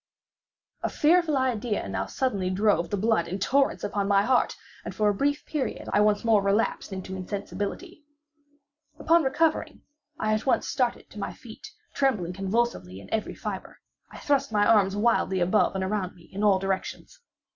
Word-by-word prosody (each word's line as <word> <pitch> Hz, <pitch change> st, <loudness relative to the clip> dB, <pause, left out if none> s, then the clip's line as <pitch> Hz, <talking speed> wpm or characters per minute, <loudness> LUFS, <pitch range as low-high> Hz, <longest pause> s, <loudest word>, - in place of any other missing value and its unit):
A -, -, -1 dB
fearful 320 Hz, -1 st, +3 dB
idea 240 Hz, -, -1 dB
now 95 Hz, 0 st, -3 dB
suddenly 200 Hz, -, -1 dB
drove 185 Hz, -3 st, +1 dB
the 205 Hz, -, -1 dB
blood 215 Hz, -4 st, +1 dB
in 190 Hz, -, -3 dB
torrents 270 Hz, +8 st, +1 dB
upon 200 Hz, -1 st, -1 dB
my 200 Hz, 0 st, +4 dB
heart, 250 Hz, +3 st, +1 dB, 0.3 s
and -, -, -7 dB
for 210 Hz, -1 st, +2 dB
a -, -, +2 dB
brief 285 Hz, +7 st, -1 dB
period, 295 Hz, -4 st, -3 dB
I 205 Hz, -, +4 dB
once 210 Hz, +1 st, +2 dB
more 220 Hz, -3 st, +4 dB
relapsed 200 Hz, +2 st, 0 dB
into 190 Hz, 0 st, -6 dB
insensibility. 205 Hz, -, -5 dB, 0.9 s
Upon 335 Hz, +1 st, +4 dB
recovering, 310 Hz, +3 st, 0 dB, 0.3 s
I 215 Hz, 0 st, 0 dB
at 215 Hz, +4 st, -2 dB
once 255 Hz, -, +2 dB
started 250 Hz, -4 st, -1 dB
to -, -, -9 dB
my -, -, -4 dB
feet, -, -, -12 dB, 0.3 s
trembling 210 Hz, -11 st, 0 dB
convulsively 195 Hz, -, -2 dB
in 100 Hz, -, -10 dB
every 220 Hz, -1 st, -2 dB
fibre. -, -, -6 dB, 0.3 s
I -, -, -12 dB
thrust 280 Hz, -3 st, 0 dB
my 205 Hz, -1 st, +3 dB
arms 200 Hz, -3 st, +4 dB
wildly 205 Hz, -3 st, +1 dB
above 185 Hz, +3 st, +2 dB
and 190 Hz, -, -1 dB
around 190 Hz, -1 st, -2 dB
me 175 Hz, -, -18 dB
in 200 Hz, +2 st, -3 dB
all 200 Hz, -2 st, +5 dB
directions. 195 Hz, -, -4 dB
210 Hz, 170 wpm, -26 LUFS, 190-260 Hz, 0.9 s, all